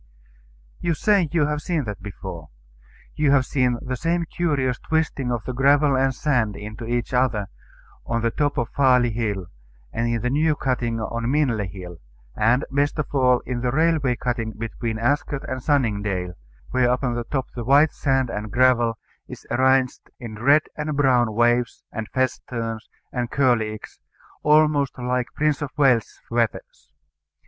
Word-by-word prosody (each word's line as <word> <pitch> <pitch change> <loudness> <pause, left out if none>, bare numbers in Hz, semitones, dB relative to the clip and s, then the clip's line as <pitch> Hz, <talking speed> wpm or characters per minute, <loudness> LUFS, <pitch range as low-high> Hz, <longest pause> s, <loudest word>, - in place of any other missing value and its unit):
You 170 -2 0
say 200 -3 +2
you 165 -3 +2
have 150 0 -2
seen 165 -3 -1
that 105 -4 -6
before. 95 -5 -8 0.6
You 150 -2 +1
have 135 -2 +4
seen 125 -3 +1
the 130 0 -3
same 170 +5 0
curious 145 -8 -1
twisting 160 -5 -1
of 120 -3 -2
the 130 - -5
gravel 140 +2 +4
and 135 0 +2
sand 120 -9 0
into 105 +3 -7
each 120 +1 -2
other 120 -6 +1 0.5
on 115 0 -2
the 115 - +1
top 145 +2 -1
of 120 0 -1
Farley 125 -3 +3
Hill, 105 -4 -2 0.5
and 115 +1 -1
in 115 -2 -1
the 125 - 0
new 155 +2 +2
cutting 120 -4 -1
on 115 +1 -3
Minley 130 -8 +1
Hill; 90 -2 -9 0.4
and, 120 +6 +2
best 145 +3 +1
of 155 - -3
all, 125 -3 +3
in 125 -1 -4
the 125 - 0
railway 150 -2 +2
cutting 120 -2 -3
between 115 0 -4
Ascot 140 +4 0
and 130 0 -4
Sunningdale, 105 - 0 0.4
where 125 -1 +2
upon 125 0 0
the 120 0 -3
top 135 +1 -3
the 120 - -5
white 145 +5 +5
sand 135 -3 0
and 105 0 -5
gravel 120 -2 +3 0.3
is - - -10
arranged 130 +1 +2
in 110 -3 -8
red 145 +5 +5
and 150 -1 -3
brown 125 -6 +3
waves, 120 0 +1
and 110 -1 -5
festoons, 115 -3 -3 0.2
and 120 -2 -2
curlicues, 115 -6 0 0.4
almost 150 -2 +3
like 125 0 -1
Prince 150 -1 +1
of 145 - -2
Wales's 130 -6 +2
feathers. 115 -2 -3
125 Hz, 160 wpm, -23 LUFS, 115-140 Hz, 0.6 s, white